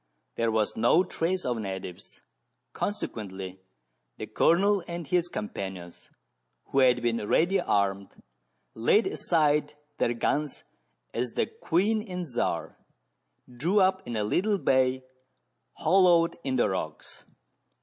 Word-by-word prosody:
There 115 0 +1
was 110 -1 0
no 120 +11 +4
trace 180 0 -2
of 120 -2 -1
natives, 95 -3 -7 0.5
consequently 95 - -5 0.6
the - - -5
Colonel 200 +3 +3
and 170 -1 -5
his 175 +1 +1
companions, 95 - -7 0.6
who 135 - +2
had 125 -2 +4
been 115 -3 -1
ready 185 - +3
armed, 100 - 0 0.7
laid 160 - +3
aside 150 -3 +1 0.2
their 120 - +1
guns 145 +5 -1 0.5
as 120 0 -2
the - - +1
" - - -34
Queen 210 +6 +2
and 180 -4 -5
Czar" 125 -6 -3 0.7
drew 155 +12 0
up 190 0 +3
in 120 - -4
a 105 - 0
little 200 - +1
bay 130 -5 +2 0.7
hollowed 175 -1 +4
in 130 -1 -1
the 120 - +3
rocks. 80 -6 -5
130 Hz, 125 wpm, -27 LUFS, 110-180 Hz, 0.7 s, no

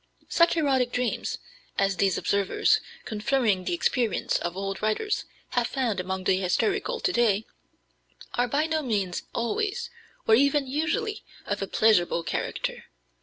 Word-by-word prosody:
Such 335 0 +4
erotic 265 -5 +2
dreams 245 -1 -1 0.4
as 195 -1 +1
these 195 -3 +2
observers, 200 - +2 0.3
confirming 215 -3 +1
the - - 0
experience 240 - +1
of 175 +1 -4
old 195 0 -3
writers, 215 - 0 0.2
have 240 -2 +1
found 245 -7 -1
among 190 +1 -3
the 185 0 +3
hysterical 405 - 0
to 370 - 0
day 220 -3 +2 0.9
are 245 0 +1
by 285 +6 +1
no 320 -1 0
means 200 -9 -1
always, 425 - -1 0.4
or 220 - +5
even 280 +4 +4
usually, 340 - -1 0.2
of 205 0 -2
a 195 - -2
pleasurable 180 -7 +3
character. 150 - -3
235 Hz, 140 wpm, -27 LUFS, 195-310 Hz, 0.9 s, or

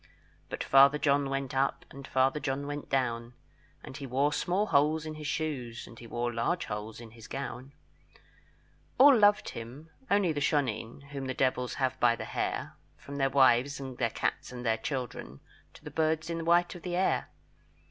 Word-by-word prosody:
But - - -4
Father 140 +2 +6
John 140 -1 +2
went 135 -1 -3
up, 135 +1 0
And 135 0 -10
Father 130 +3 +2
John 140 0 -2
went 145 0 -5
down; 120 -2 -1 0.5
And 130 - -9
he 140 -2 -6
wore 140 +4 +1
small 180 +7 0
holes 155 -2 +2
in 155 - -5
his 155 -1 -6
shoes, 140 -7 -3
And 115 - -13
he 120 - -10
wore 120 +1 -2
large 115 +10 -1
holes 105 +1 -6
in 115 -2 -11
his 115 -1 -13
gown. 135 0 -6 1.2
All 275 +1 +8
loved 205 -2 +4
him, 130 +8 -9 0.2
only 200 -4 +3
the 145 -2 -2
shoneen, 140 -2 -1
Whom 140 -2 -5
the 130 - -3
devils 125 -1 0
have 130 -1 -1
by 120 -1 +4
the - - -6
hair, - - -3 0.2
From 140 0 -9
their 135 -1 +2
wives 130 0 +4
and 130 -2 -7
their 115 -2 +2
cats - - -2
and 125 -1 -7
their 110 -1 +2
children, 115 - -5 0.4
To - - -15
the - - -8
birds 160 +1 0
in 165 - -2
the 165 - -5
white 175 +1 +3
of 175 - -10
the 175 0 -3
air. 185 +1 +1
135 Hz, 190 wpm, -30 LUFS, 120-150 Hz, 1.2 s, All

